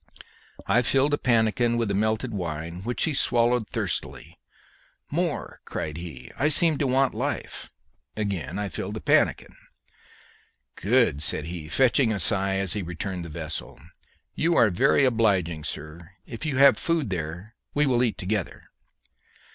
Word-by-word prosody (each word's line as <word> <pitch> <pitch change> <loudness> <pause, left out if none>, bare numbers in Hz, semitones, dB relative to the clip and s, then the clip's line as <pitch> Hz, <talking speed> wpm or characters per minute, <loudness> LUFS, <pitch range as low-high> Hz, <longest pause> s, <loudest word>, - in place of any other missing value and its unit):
I 125 - +3
filled 135 +4 +1
a - - +3
pannikin 120 0 +2
with 115 -3 -1
the - - 0
melted 110 +4 -1
wine, 85 -2 -5
which 120 +4 -2
he 160 - +1
swallowed 120 -3 +2
thirstily. - - -4 0.7
"More!" - - -2
cried 75 +1 -5
he. 75 -8 -9
"I 145 - +3
seem 160 -1 +5
to 140 - +1
want 130 +1 +2
life." - - -4 0.5
Again 95 -6 -3
I 105 0 -2
filled 100 +3 -5
the - - -4
pannikin. - - +1 1.2
"Good!" 105 - +1
said 75 0 +4
he, 80 -2 -7
fetching 125 - +3
a 105 - -2
sigh 95 +2 +2
as 95 -1 0
he 105 - -2
returned 85 +1 -5
the - - -8
vessel; 80 -4 -6 0.5
"you 170 +1 +1
are 105 - +4
very 135 +8 +3
obliging, 95 -10 +1
sir. 80 +5 -8
If 120 +6 -6
you 140 -4 -2
have 140 0 +6
food 165 - -1
there, 90 +5 -5 0.2
we 150 +1 +3
will 125 -3 +2
eat 120 -3 0
together." 100 +1 -3
105 Hz, 155 wpm, -25 LUFS, 85-125 Hz, 1.2 s, have